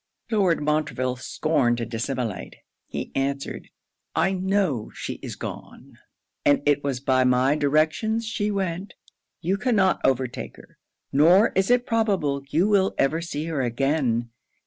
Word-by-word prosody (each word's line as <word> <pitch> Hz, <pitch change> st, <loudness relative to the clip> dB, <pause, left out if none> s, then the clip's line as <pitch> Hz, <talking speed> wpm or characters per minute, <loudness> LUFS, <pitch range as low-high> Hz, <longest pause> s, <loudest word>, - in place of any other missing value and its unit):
Lord 190 Hz, -8 st, +2 dB
Montreville 145 Hz, -4 st, 0 dB
scorned 130 Hz, -3 st, 0 dB
to 120 Hz, -, -2 dB
dissimulate. 115 Hz, -3 st, -4 dB, 0.3 s
He -, -, -5 dB
answered, 140 Hz, +1 st, -3 dB, 0.5 s
'I 190 Hz, -, +2 dB
know 185 Hz, -, 0 dB
she -, -, -5 dB
is -, -, -6 dB
gone, -, -, -9 dB, 0.4 s
and 145 Hz, 0 st, +3 dB
it 145 Hz, -1 st, +2 dB
was 135 Hz, -3 st, -1 dB
by 130 Hz, -1 st, +2 dB
my 125 Hz, +3 st, +3 dB
directions 155 Hz, +10 st, +1 dB
she 215 Hz, -1 st, -1 dB
went. 190 Hz, -1 st, -3 dB, 0.5 s
You 185 Hz, +4 st, 0 dB
cannot 210 Hz, -5 st, +2 dB
overtake 130 Hz, -2 st, -1 dB
her; -, -, -18 dB, 0.3 s
nor 175 Hz, +10 st, +5 dB
is 190 Hz, +2 st, 0 dB
it 245 Hz, 0 st, +3 dB
probable 195 Hz, -12 st, 0 dB
you 175 Hz, +7 st, +2 dB
will 200 Hz, -2 st, +2 dB
ever 155 Hz, +5 st, +1 dB
see 160 Hz, -2 st, -4 dB
her 160 Hz, -4 st, -2 dB
again. 120 Hz, -2 st, 0 dB
150 Hz, 140 wpm, -24 LUFS, 130-190 Hz, 0.5 s, nor